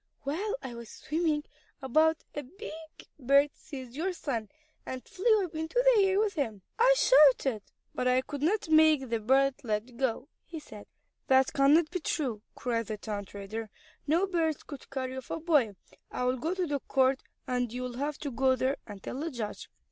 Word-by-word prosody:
"While 390 - -2
I 245 - -6
was 235 -2 -9
swimming 310 -2 -1 0.4
about 315 +5 +2
a 290 - -3
big 295 +5 -9 0.5
bird 280 +2 +4
seized 260 -4 -9
your 350 +7 -2
son, 235 - -3 0.3
and 255 -1 -6
flew 415 +1 +2
up 340 - -10
into 320 +4 -5 0.2
the 410 - +5
air 385 0 +2
with 425 -2 +1
him. 225 - -3 0.2
I - - +6
shouted, 270 - +5 0.3
but 250 - -1
I 255 +1 +4
could 285 +1 -7
not 370 +6 +1
make 310 -4 +5
the 230 -1 0
bird 270 +5 +3
let 225 +2 -3
go," 260 0 -1 0.2
he 325 -1 -8
said. 215 -8 -12 0.4
"That 265 0 +4
cannot 295 +4 +4
be 365 - -2
true," 260 -9 -2
cried 230 -2 -2
the 215 -1 -4
town 205 -1 -5
trader. 205 +3 -6 0.4
"No 335 +6 +3
bird 330 -5 -1
could 285 -3 -10
carry 260 -1 -4
off 260 - -8
a - - -3
boy. 295 - +2 0.3
I - - -3
will 250 +1 +1
go 325 +8 -2
to 370 -1 0
the 290 -3 -1
court, 265 0 +2 0.2
and 250 -3 -1
you 250 +1 -4
will 245 -1 -5
have 290 +2 -2
to 285 - -3
go 260 +2 +3
there, 260 +2 0
and 205 -3 -10
tell 260 - -5
the 325 +3 -2
judge." 235 -7 -6
275 Hz, 195 wpm, -30 LUFS, 245-315 Hz, 0.5 s, I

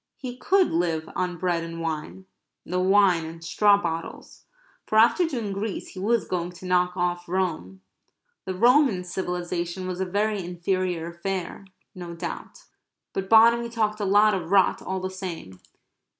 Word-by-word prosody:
He 250 -2 -6
could 375 +8 +2
live 165 -2 0
on 180 -1 -2
bread 175 -2 -1
and 165 0 -7
wine 165 +3 -5 0.4
the 180 +1 -2
wine 190 -2 +4
in 165 +1 -8
straw 200 +4 +4
bottles 165 -3 -6 0.4
for 215 - +1
after 240 +10 +5
doing 235 -10 -3
Greece 200 +1 -4
he 185 - -10
was 225 +4 +1
going 175 -1 -3
to 180 +1 -12
knock 180 0 +1
off 175 -1 -2
Rome. 160 - -2 0.6
The 185 - -3
Roman 240 -2 +4
civilization 180 0 -4
was 185 0 -4
a - - +1
very 205 +1 -1
inferior 180 -1 -2
affair, 190 +2 -5 0.3
no 175 -2 -8
doubt. 165 - -7 0.5
But 190 0 -4
Bonamy 235 +1 +6
talked 215 -2 -1
a 205 - -1
lot 205 +2 +5
of 175 -4 -3
rot, 195 -1 +3
all 190 0 -4
the 185 0 -4
same. 170 - -7
185 Hz, 160 wpm, -25 LUFS, 175-205 Hz, 0.6 s, Bonamy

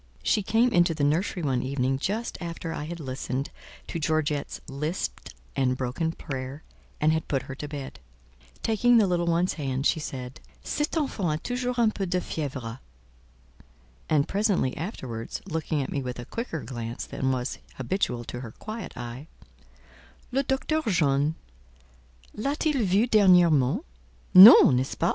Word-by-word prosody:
She 210 - +2
came 225 +5 +3
into 175 -3 +3
the 150 - -1
nursery 170 +4 0
one 130 -4 +1
evening 130 0 -1
just 220 +9 -2
after 165 -1 -5
I 145 - -4
had 170 +2 -6
listened 130 -1 -4 0.3
to 170 - -5
Georgette's 155 -2 -1
lisped 150 +6 -4 0.2
and 130 -1 +1
broken 135 +6 -2
prayer, 135 -2 -6 0.4
and 155 +1 +3
had 160 - -2
put 135 -3 -1
her 135 - -7
to 145 +2 -6
bed. 140 - -7 0.6
Taking 240 +2 +4
the 220 - +5
little 175 -2 0
one's 170 +2 +2
hand, 135 0 -2
she 160 - +3
said, 130 -4 -6 0.2
"Cette 295 +2 -2
enfant 200 - 0
a - - -2
toujours 250 0 -2
un 230 -2 +4
peu 195 -2 -3
de 180 +1 0
fièvre." 130 -8 -5 1.3
And 150 -2 +3
presently 200 - +1
afterwards, 130 - -5
looking 155 -4 -1
at - - -6
me 140 - -1
with 125 -1 -5
a 120 - -7
quicker 230 - -5
glance 120 -2 -5
than 130 0 -2
was 130 0 -3 0.2
habitual 130 -3 -1
to 120 - -7
her 115 -3 -8
quiet 220 +1 -7
eye, 120 +4 -7 1.0
"Le 265 +2 +2
Docteur 275 +4 0
John 150 -5 +2 1.0
l'a 275 +7 -2
t 310 0 +1
il 270 -6 0
vue 195 +5 +3
dernièrement? 175 - +5 0.5
Non, 185 - +11
n'est 125 - +2
ce - - -8
pas?" 170 - +1
155 Hz, 160 wpm, -26 LUFS, 130-195 Hz, 1.3 s, Non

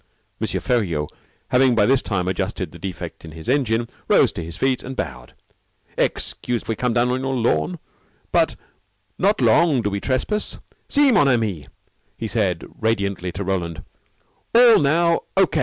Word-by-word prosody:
M. - - 0
Feriaud, 85 -12 -1 0.4
having 125 -1 +4
by 105 -2 +4
this 130 +2 +3
time 90 -4 -2
adjusted 95 -1 -2
the - - -12
defect 90 -3 -7
in 80 -2 -10
his 80 0 -10
engine, 120 -4 +1 0.2
rose - - +4
to 85 - -5
his 85 +1 -7
feet, 130 -1 +1
and 130 +1 -7
bowed. 65 - -6 0.6
"Excuse 120 -2 -1
if - - -20
we 115 - -1
come 125 +1 -1
down 120 +1 +3
on 130 +1 -1
your 135 0 -2
lawn. 95 -11 0 0.5
But - - +2 0.6
not 205 +3 +2
long 155 -8 +4
do 105 - -1
we 100 - -2
trespass. 145 - -1 0.3
See, 285 -2 +5
mon 180 - +4
ami," 110 - 0 0.5
he - - -4
said - - -1
radiantly 100 -5 -1
to 100 - -4
Roland, 90 -4 -3 0.7
"all 235 -1 +8
now 165 +4 +3 0.2
O. 195 - +7
115 Hz, 165 wpm, -21 LUFS, 95-135 Hz, 0.7 s, all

